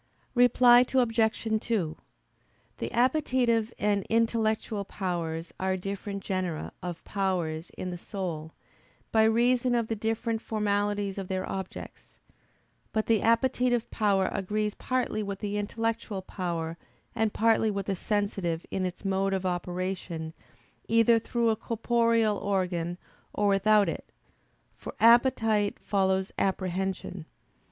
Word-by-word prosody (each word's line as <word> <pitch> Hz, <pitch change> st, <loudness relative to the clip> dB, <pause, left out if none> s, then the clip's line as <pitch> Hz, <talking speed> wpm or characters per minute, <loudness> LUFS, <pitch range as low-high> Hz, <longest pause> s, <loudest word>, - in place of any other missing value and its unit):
Reply 245 Hz, 0 st, +6 dB
Obj. 225 Hz, -3 st, +2 dB, 0.2 s
2: 185 Hz, -11 st, -1 dB, 0.8 s
The -, -, -3 dB
appetitive 245 Hz, -3 st, +2 dB
and 205 Hz, -1 st, +1 dB
intellectual 220 Hz, -2 st, +1 dB
powers 170 Hz, -4 st, -4 dB
are 190 Hz, 0 st, 0 dB
different 200 Hz, +1 st, -5 dB
genera 185 Hz, -4 st, -2 dB
of 175 Hz, -2 st, -6 dB
powers 175 Hz, -5 st, -2 dB
in 185 Hz, -, -4 dB
the 175 Hz, -, -6 dB
soul, 170 Hz, -6 st, -5 dB, 0.6 s
by 220 Hz, -, +4 dB
reason 245 Hz, +2 st, +3 dB
of 230 Hz, -2 st, 0 dB
the 225 Hz, -, 0 dB
different 225 Hz, +1 st, -1 dB
formalities 205 Hz, -2 st, -1 dB
of 190 Hz, -, -5 dB
their 185 Hz, 0 st, -2 dB
objects. 190 Hz, -1 st, -7 dB, 0.8 s
But 220 Hz, 0 st, 0 dB
the 225 Hz, -3 st, +3 dB
appetitive 245 Hz, 0 st, +2 dB
power 200 Hz, -3 st, +2 dB
agrees 210 Hz, +2 st, -1 dB
partly 250 Hz, -3 st, -1 dB
with 200 Hz, -1 st, -4 dB
the 205 Hz, 0 st, -3 dB
intellectual 215 Hz, -1 st, -2 dB
power 170 Hz, -3 st, -4 dB, 0.3 s
and 220 Hz, -2 st, +1 dB
partly 225 Hz, 0 st, +3 dB
with 200 Hz, -2 st, -2 dB
the 195 Hz, -, -1 dB
sensitive 195 Hz, -4 st, -1 dB
in 185 Hz, -1 st, 0 dB
its 180 Hz, +2 st, -9 dB
mode 195 Hz, 0 st, +1 dB
of 190 Hz, 0 st, -3 dB
operation 180 Hz, -2 st, -3 dB, 0.5 s
either 230 Hz, 0 st, +5 dB
through 230 Hz, 0 st, +1 dB
a -, -, +1 dB
corporeal 230 Hz, -1 st, +1 dB
organ 180 Hz, -3 st, -1 dB, 0.4 s
or 205 Hz, -1 st, +2 dB
without 205 Hz, +1 st, +4 dB
it: 165 Hz, -, -5 dB, 0.6 s
for -, -, -9 dB
appetite 225 Hz, -3 st, +4 dB
follows 190 Hz, -1 st, 0 dB
apprehension. 190 Hz, -2 st, -2 dB
205 Hz, 125 wpm, -28 LUFS, 185-225 Hz, 0.8 s, Reply